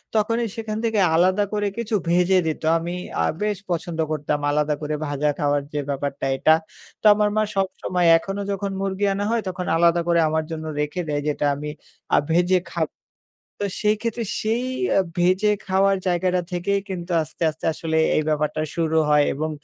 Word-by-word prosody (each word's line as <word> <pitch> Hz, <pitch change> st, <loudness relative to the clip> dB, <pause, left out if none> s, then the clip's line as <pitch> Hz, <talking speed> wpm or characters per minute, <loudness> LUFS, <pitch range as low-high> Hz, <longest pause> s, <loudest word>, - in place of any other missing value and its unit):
তখনই 230 Hz, +2 st, +1 dB
সেখান 220 Hz, -1 st, -4 dB
থেকে 225 Hz, -2 st, +1 dB, 0.2 s
আলাদা 185 Hz, +4 st, +3 dB
করে 205 Hz, -1 st, 0 dB
কিছু 225 Hz, -2 st, -1 dB
ভেজে 180 Hz, +2 st, +4 dB
দিত। 155 Hz, -, -2 dB, 0.2 s
আমি 170 Hz, +2 st, -4 dB, 0.3 s
আ -, -, +3 dB, 0.2 s
বেশ 210 Hz, -1 st, 0 dB
পছন্দ 170 Hz, -1 st, -3 dB
করতাম 150 Hz, -1 st, -1 dB
আলাদা 150 Hz, 0 st, +1 dB
করে 150 Hz, 0 st, -2 dB
ভাজা 145 Hz, +1 st, 0 dB
খাওয়ার 145 Hz, -1 st, +1 dB
যে 150 Hz, -, -1 dB
ব্যাপারটা 140 Hz, 0 st, -3 dB
এটা। 155 Hz, -, +5 dB, 0.5 s
তো -, -, -14 dB
আমার 210 Hz, 0 st, +2 dB
মা 215 Hz, -, +4 dB
সবসময় 185 Hz, -2 st, 0 dB
এখনো 195 Hz, +4 st, -4 dB
যখন 200 Hz, 0 st, -2 dB
মুরগি 195 Hz, +1 st, -1 dB
আনা 200 Hz, +1 st, -2 dB
হয় 235 Hz, -, +1 dB
তখন 180 Hz, 0 st, -4 dB
আলাদা 170 Hz, 0 st, +4 dB
করে 170 Hz, -1 st, +3 dB
আমার 160 Hz, 0 st, 0 dB
জন্য 160 Hz, -1 st, -5 dB
রেখে 150 Hz, +4 st, -1 dB
দেয়। 145 Hz, -1 st, -1 dB
যেটা 145 Hz, 0 st, 0 dB
আমি 150 Hz, +1 st, -5 dB, 0.5 s
আ -, -, +5 dB
ভেজে 180 Hz, +2 st, +3 dB
খাব। 160 Hz, -3 st, 0 dB, 0.8 s
তো -, -, +1 dB
সেই 210 Hz, 0 st, +2 dB
ক্ষেত্রে 230 Hz, 0 st, -2 dB, 0.2 s
সেই 230 Hz, +3 st, 0 dB, 0.3 s
আ -, -, +6 dB, 0.2 s
ভেজে 185 Hz, +4 st, +3 dB, 0.2 s
খাওয়ার 195 Hz, +1 st, +3 dB
জায়গাটা 180 Hz, 0 st, +1 dB
থেকেই 195 Hz, +3 st, 0 dB
কিন্তু 180 Hz, -2 st, -5 dB
আস্তে, 155 Hz, -, -9 dB
আস্তে 155 Hz, +1 st, -13 dB
আসলে 160 Hz, 0 st, -1 dB, 0.2 s
এই 155 Hz, -, +2 dB
ব্যাপারটা 155 Hz, 0 st, 0 dB
শুরু 160 Hz, -1 st, 0 dB
হয় 150 Hz, -1 st, +5 dB
এবং 155 Hz, +3 st, -2 dB
175 Hz, 180 wpm, -23 LUFS, 155-200 Hz, 0.8 s, আ